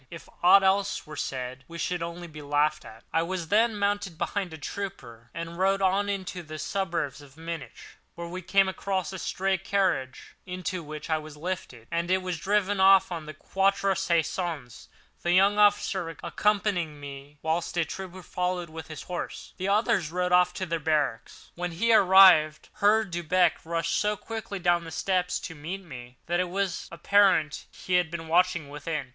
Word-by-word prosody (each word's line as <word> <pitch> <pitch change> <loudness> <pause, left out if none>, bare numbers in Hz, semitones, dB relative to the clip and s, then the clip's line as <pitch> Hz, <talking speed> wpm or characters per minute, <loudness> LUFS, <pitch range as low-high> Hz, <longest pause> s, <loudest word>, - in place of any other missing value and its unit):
If 165 -4 -10
aught 195 +3 +7
else 195 +1 +1
were 155 - -9
said 130 0 -4
we 170 - -9
should 175 0 -2
only 170 +1 -5
be 155 -2 -10
laughed 145 +1 +1
at." 110 +1 -13
I 165 - +3
was 170 -1 -3
then 220 +1 +3
mounted 200 -4 -1
behind 195 -1 -2
a 160 - -7
trooper, 145 - -7
and 165 0 -6
we - - -10
rode 195 +1 +2
on 195 +2 +2
into 190 -2 -3
the 155 -1 -8
suburbs 170 -7 -2
of 145 0 -16
Munich. 165 -2 -6 0.4
Here 170 - -6
we 180 +2 -6
came 195 +2 +3
across 190 -1 -2
a 190 - -5
stray 190 +1 -1
carriage, 180 - -1
into 185 0 -4
which 155 -1 -8
I 160 - +2
was 155 -1 -11
lifted, 150 -9 -5
and 170 +1 -1
it 185 0 +2
was 180 -3 -3
driven 205 +1 +1
off 190 0 +6
to 170 -3 -4
the 155 -1 -9
Quatre 195 +4 +1
Saisons—the 170 -3 -3
young 195 +3 +4
officer 195 -4 +2
accompanying 195 -7 0
me, 140 +1 -10
whilst 165 +2 -1
a 170 - +2
trooper 185 +2 -8
followed 180 -2 -2
with 160 -1 -8
his 155 -3 -8
horse, 180 -1 -6
and - - -33
the - - +2
others 200 -6 +2
rode 180 +1 -1
off 180 0 +5
to 185 - -2
their 165 -1 -2
barracks. 150 -7 -2
When 180 +1 -3
we 230 +1 +4
arrived, 185 -6 +6
Herr 215 +2 +4
Delbrück 175 -1 +1
rushed 165 0 -1
so 210 0 0
quickly 220 -2 -6
down 175 -1 +2
the 165 - -8
steps 180 +2 0
to 165 - -6
meet 170 +6 -6
me, 125 -6 -11
that 175 +1 0
it 180 -1 0
was 195 0 -2
apparent 175 -3 +2
he 180 -1 0
had 175 -2 +1
been 165 -1 -6
watching 175 -2 +2
within. 150 -1 -4
175 Hz, 185 wpm, -27 LUFS, 155-190 Hz, 0.4 s, aught